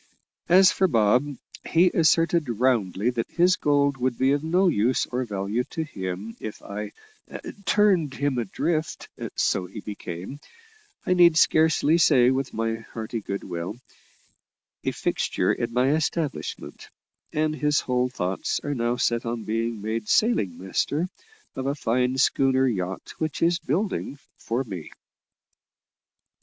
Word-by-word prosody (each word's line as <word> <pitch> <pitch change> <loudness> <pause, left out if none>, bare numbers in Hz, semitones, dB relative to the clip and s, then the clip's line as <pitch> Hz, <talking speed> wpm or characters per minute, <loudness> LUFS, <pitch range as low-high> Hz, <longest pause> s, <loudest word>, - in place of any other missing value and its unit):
As 185 +2 +7
for 190 - +2
Bob, 125 - +2 0.3
he 175 +2 +4
asserted 165 -1 +2
roundly 115 -3 +1
that 120 -2 -3
his 180 +1 +3
gold 140 -1 +2
would 125 -1 -1
be 130 +1 +3
of 145 +1 0
no 180 +4 +2
use 125 -5 +2
or 125 +1 -3
value 105 +2 -2
to 160 - -4
him 100 - -6
if 110 - -7
I 105 +1 -6 0.7
"turned 185 -9 +3
him 140 -3 0
adrift," 155 - -2 0.3
so 90 - 0
he 105 - -9
became, 100 +4 -7 0.7
I 180 - +2
need 170 -3 +6
scarcely 160 -1 +4
say 125 -6 +5
with 135 0 -1
my 115 0 -2
hearty 115 +1 -6
good 100 0 -5
will, 85 +2 -5 1.1
a - - 0
fixture - - 0
in 120 -1 -3
my 125 +3 +2
establishment; 155 0 -3 0.4
and 155 0 0
his 150 -1 +1
whole 125 0 0
thoughts 95 -6 -2
are 145 - -2
now 120 -2 0
set 120 -1 0
on 115 -1 -3
being 115 -1 -2
made 110 0 -3
sailing 105 - +2
master 145 - -1 0.5
of 130 - -3
a 140 - 0
fine 125 0 0
schooner 135 0 +3
yacht 95 -5 -3
which 155 -1 -2
is 170 +1 +3
building 165 -2 -2 0.2
for 120 +4 -2
me. 95 - -8
130 Hz, 140 wpm, -25 LUFS, 110-155 Hz, 1.1 s, As